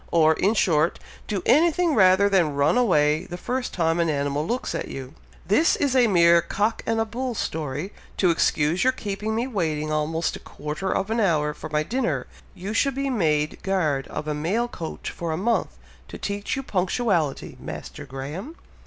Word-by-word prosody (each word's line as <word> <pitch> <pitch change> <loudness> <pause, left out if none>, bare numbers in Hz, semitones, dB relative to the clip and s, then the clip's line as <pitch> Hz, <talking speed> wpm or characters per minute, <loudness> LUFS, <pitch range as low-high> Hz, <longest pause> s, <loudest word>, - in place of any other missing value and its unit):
or, 160 -2 +4
in 200 +7 +1
short, 165 -5 +2 0.3
do 200 -4 -2
anything 335 +2 +4
rather 190 -2 +5
than 175 -7 +2
run 145 +6 +3
away 155 -11 +3
the 175 - -7
first 250 +5 -3
time 165 -1 +1
an 170 -1 +2
animal 145 0 0
looks 245 +2 -2
at - - -3
you. 135 +1 -7 0.3
This 295 - +4
is 275 -2 0
a 250 -2 +5
mere 170 -3 +5
cock 205 +6 -1
and 225 0 +1
a 225 - +2
bull 245 +2 -4
story, 155 +1 -3 0.2
to 180 -3 +4
excuse 160 +1 +1
your 260 0 +3
keeping 210 -2 -3
me 230 +2 0
waiting 160 - -2
almost 155 +2 -1
a - - -8
quarter 150 +6 -5
of 195 +3 -1
an 230 - +1
hour 155 -7 +2
for - - -8
my 150 0 +1
dinner! 245 +7 -1 0.3
you 195 +4 -5
should 275 +4 +1
be 275 0 -1
made 155 -9 0
guard 155 -8 0
of 155 - -5
a 150 - 0
mail 185 +11 0
coach 170 -9 -6
for 170 -1 -4
a 160 - -1
month, 230 +6 0 0.3
to - - -8
teach 200 0 -3
you 270 - -4
punctuality, 180 - 0
Master - - -7
Graham." 150 - -6
185 Hz, 190 wpm, -24 LUFS, 155-225 Hz, 0.3 s, rather